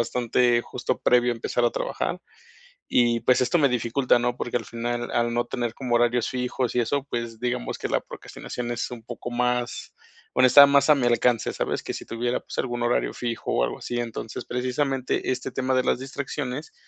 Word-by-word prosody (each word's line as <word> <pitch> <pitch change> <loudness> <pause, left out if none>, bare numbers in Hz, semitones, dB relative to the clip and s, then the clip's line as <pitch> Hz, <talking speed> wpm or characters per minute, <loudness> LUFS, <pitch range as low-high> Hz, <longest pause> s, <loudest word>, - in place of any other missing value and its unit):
bastante 120 0 +2
justo - - -3
previo 120 0 +3
a - - -4
empezar 120 +1 -1
a 120 - +4
trabajar. - - -3 0.7
Y 120 -1 +3
pues, 125 - +3
esto 130 +8 +2
me 140 - +4
dificulta, 125 +1 +2
¿no? 120 0 -1
Porque, 120 -1 -3
al 115 - -2
final, 120 +1 -3
al 120 0 +1
no 120 0 +1
tener 120 -2 -3
como 125 -3 -2
horarios 120 0 +2
fijos 125 -1 -2
y 125 - +3
eso, 140 +3 0
pues, 120 -2 -4
digamos 125 - -2
que - - -3
la - - +1
procrastinación 120 -1 -7
es 120 - -3
un 120 -2 -8
poco 120 +1 -7
más 125 0 -1 0.4
bueno, 130 0 +6
está 140 +3 +10
más 140 +2 +4
a 150 - +7
mi 125 -3 +1
alcance, 120 -1 +2
¿sabes? - - -2
Que - - -3
si - - -6
tuviera, 120 +2 -2
pues, - - -10
algún 120 -2 -2
horario 120 +1 +1
fijo 120 -2 -3
o - - +2
algo - - -3
así, 120 0 -3
entonces 115 -1 -5
precisamente 130 +1 -1
este 130 0 -3
tema 130 0 0
de 130 - +2
las - - +1
distracciones, 135 +1 -5
120 Hz, 205 wpm, -25 LUFS, 120-130 Hz, 0.7 s, está